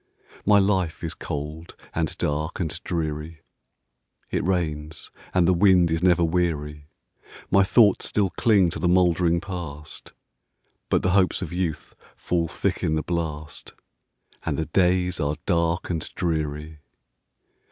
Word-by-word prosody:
My 105 -1 +7
life 95 -5 +1
is 80 - -3
cold, 75 +3 -6 0.2
and - - -2
dark, 75 +2 -2
and 80 -5 -3
dreary; 80 -1 -3 0.9
It - - 0
rains, 80 -4 -2 0.2
and 90 -2 +3
the 95 - +5
wind 90 -2 +4
is 80 0 0
never 90 -1 +4
weary; 75 -4 -1 0.6
My 100 - +6
thoughts 105 0 +4
still 100 -3 +1
cling 100 -7 +3
to 100 - -5
the 90 - +1
mouldering 85 -1 +3
Past, 85 -6 -7 0.8
But - - +2
the 95 - +2
hopes 95 0 +2
of 85 - -6
youth 85 -4 -3 0.2
fall 85 -2 -1
thick - - -2
in 80 - +1
the 80 - -1
blast, 80 -3 -4 0.7
And - - -2
the 80 - -1
days 90 0 +1
are 75 -1 0
dark 85 -1 0
and 80 -2 -1
dreary. 80 -2 -2
85 Hz, 140 wpm, -24 LUFS, 80-90 Hz, 0.9 s, My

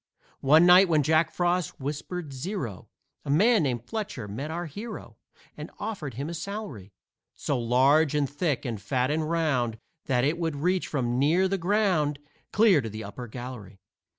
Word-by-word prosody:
One 155 +5 +5
night 180 +1 +7
when 155 -3 +3
Jack 155 +2 +2
Frost 175 -1 -1
whispered 150 +3 -5
zero, 130 - -5 0.3
A - - -8
man 210 +10 +4
named 125 -5 -1
Fletcher 205 - -5
met 125 +10 -5
our 170 +2 -4
hero 210 +9 -8 0.4
And - - -8
offered 185 - -5
him 140 +4 -4
a 170 - -5
salary 165 - -6 0.4
So 140 -3 -2
large 135 +6 +3
and 145 -2 +1
thick 145 0 -2
and 115 -5 -4
fat 125 +6 0
and 155 0 -1
round 135 -9 0 0.3
That 125 -2 +2
it 155 +5 0
would 165 -3 -1
reach 180 +6 0
from 125 -4 -1
near 165 +7 +3
the 195 0 -1
ground 175 -6 +1 0.3
Clear 210 -8 +5
to 115 - -5
the 110 +1 -7
upper 120 +5 -8
gallery. 110 -5 -9
150 Hz, 170 wpm, -27 LUFS, 125-175 Hz, 0.4 s, night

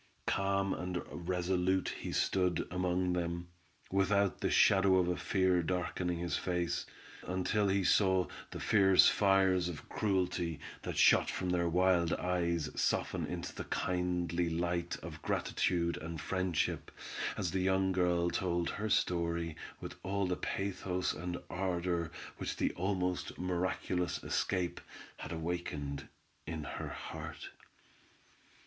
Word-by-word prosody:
Calm 100 0 +1
and 90 0 -3
resolute 90 +1 0
he - - -5
stood 90 -3 +1
among 90 0 +1
them, 85 0 -2 0.4
without 100 0 +2
the - - +1
shadow 95 -1 +5
of 90 -1 +3
a 90 - +1
fear 95 -1 +2
darkening 90 0 -1
his 85 -2 -1
face, 90 -2 -1 0.4
until 95 +3 +1
he 95 0 +2
saw 95 -1 +4 0.2
the - - -6
fierce 95 -3 +6
fires 95 -3 +4
of 85 - -8
cruelty 90 -5 0 0.2
that - - -4
shot - - +6
from 90 -1 -2
their 85 -1 +2
wild 90 -1 +3
eyes 85 -3 0
soften - - 0
into - - -4
the - - -6
kindly 90 -1 0
light 85 +1 -1
of - - -8
gratitude 85 -1 0
and 80 0 -6
friendship, 90 -3 -1 0.5
as 90 - -1
the 95 0 0
young 95 0 +2
girl 90 -1 +2
told 85 -2 0
her 110 +1 -3
story 85 -6 +1 0.2
with - - -6
all 100 +1 0
the 90 0 0
pathos 95 -2 -2
and 90 0 -4
ardor 90 -2 -1 0.3
which - - -3
the - - +1
almost 90 -1 -1
miraculous 90 0 -1
escape, 90 -3 -1 0.4
had - - -7
awakened 80 -4 -3 0.4
in 80 -1 -4
her - - -5
heart. - - -7
90 Hz, 130 wpm, -33 LUFS, 85-95 Hz, 0.5 s, fierce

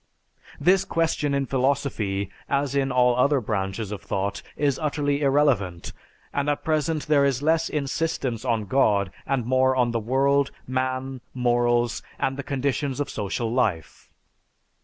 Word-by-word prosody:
This 190 +1 +4
question 160 -5 0
in 140 0 0
philosophy, 130 -8 -1 0.2
as 140 -1 0
in 135 -1 +1
all 125 -1 +4
other 140 +3 +3
branches 100 -1 -3
of 105 - -5
thought, 100 +1 -2 0.2
is 140 -2 +1
utterly 145 -2 0
irrelevant 135 - +1 0.4
and 140 +1 0
at 145 - -1
present 155 -1 0
there 150 -2 +4
is 140 -1 +1
less 160 +1 +2
insistence 140 -5 -2
on 115 -4 0
God 100 -4 +2 0.2
and 135 -4 0
more 130 +1 +3
on 125 -2 +2
the 115 - 0
world, 135 +4 +2 0.2
man, 130 0 -2
morals, 120 -1 +1 0.2
and 135 - -1
the 140 - -4
conditions 140 0 -2
of 145 - -2
social 110 +3 -2
life. 105 - -1
130 Hz, 145 wpm, -25 LUFS, 120-140 Hz, 0.4 s, This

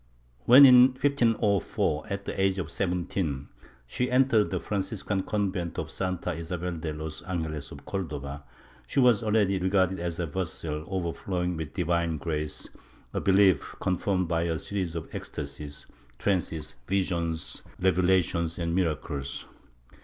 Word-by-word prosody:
When, 135 +3 +10
in 125 0 +8
1504, 115 - +1
at 100 0 -4
the - - -3
age 95 0 +2
of 85 -4 -3
17, 90 -6 -2 0.4
she 125 - -2
entered 125 -4 +4
the - - -1
Franciscan 100 0 -2
convent 95 -5 -2
of - - -3
Santa 90 -2 -2
Isabel 85 +2 -4
de 80 -2 -4
los 75 0 -6
Angeles 80 -5 -4
of 70 - -11
Cordova, 75 -7 -4 0.5
she - - 0
was 125 -5 +5
already 105 -3 +2
regarded 95 0 +2
as 85 -1 -3
a 85 - 0
vessel 80 -2 -3
overflowing 90 -1 -2
with 80 -2 -6
divine 85 -2 0
grace, 75 0 -3 0.5
a - - -1
belief 95 -1 +3
con 95 - +1
firmed 95 0 0
by 85 -1 +1
a 85 -1 0
series 90 -2 -3
of 85 - -4
ecstasies, 70 0 -7 0.3
trances, 85 -6 -1
visions, 85 -4 -1 0.2
revelations 90 -2 +2
and 85 -1 -1
miracles. 75 -6 -2
90 Hz, 140 wpm, -28 LUFS, 80-100 Hz, 0.5 s, When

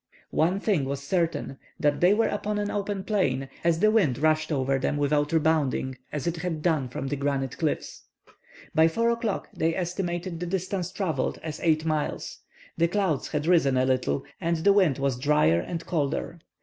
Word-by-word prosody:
One 180 +5 +2
thing 195 -10 +1
was 140 +1 -4
certain, 160 -4 -1 0.2
that 145 -1 +1
they 180 +4 +5
were 225 - +2
upon 210 0 -2
an 205 0 -1
open 200 -1 -2
plain, 135 - 0
as 170 0 +2
the 215 - +5
wind 180 - +3
rushed 155 +2 +1
over 135 -1 +1
them 145 - -1
without 145 +1 +1
rebounding 155 -5 +1 0.2
as 150 0 -4
it 170 0 -1
had 160 -2 -3
done 155 -7 +1
from 130 - -5
the 145 - -1
granite 140 -2 -1
cliffs. 155 -3 -2 0.7
By 160 +1 +5
4 230 +8 +1
o'clock 230 -3 -2
they 165 +1 +1
estimated 175 -1 -3
the 175 - -3
distance 185 0 -2
travelled 190 -4 -1
as 160 -2 -5
eight 160 -2 +2
miles. 155 -2 -2 0.4
The 170 - +4
clouds 185 -5 0
had 150 0 -2
risen 160 -7 +3
a 130 - +3
little, 130 +1 0 0.2
and 170 -1 +1
the 195 +5 +4
wind 185 -9 +3
was 135 -3 -1
drier 145 - +3
and 170 - -5
colder. 155 +1 -2
160 Hz, 185 wpm, -26 LUFS, 140-180 Hz, 0.7 s, they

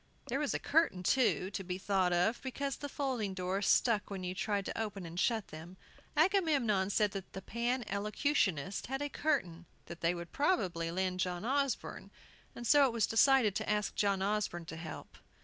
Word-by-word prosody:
There 265 +3 0
was 295 -2 -1
a - - +2
curtain, 300 - +1
too, 215 -4 +2
to 195 - -4
be 180 0 -4
thought 190 -2 +1
of, 180 +7 +1
because 275 0 -3
the 285 - -6
folding 250 -9 -2
doors 185 +2 -1
stuck 220 -4 +3
when 195 -2 -5
you 180 0 -3
tried 200 +1 -1
to - - -4
open 205 -4 -4
and 170 +1 -6
shut 220 -1 +1
them. 165 +4 -10 0.4
Agamemnon 295 - +3
said 205 0 +2
that 195 -1 -7
the 190 - -6
Pan 240 +2 -1
Elocutionists 200 - 0
had 270 +3 -2
a 290 - -2
curtain 180 - -1 0.2
they 170 0 -1
would 170 -1 -7
probably 185 - 0
lend 185 +1 -1
John 180 +1 -2
Osborne, 275 +1 -1 0.5
and 240 - -7
so 285 +3 +6
it 245 - -3
was 230 -3 +2
decided 235 -2 +4
to - - -4
ask 210 0 0
John 200 -2 +1
Osborne 200 -4 -1
to 160 - -7
help. 160 -1 -9
205 Hz, 185 wpm, -33 LUFS, 185-260 Hz, 0.5 s, so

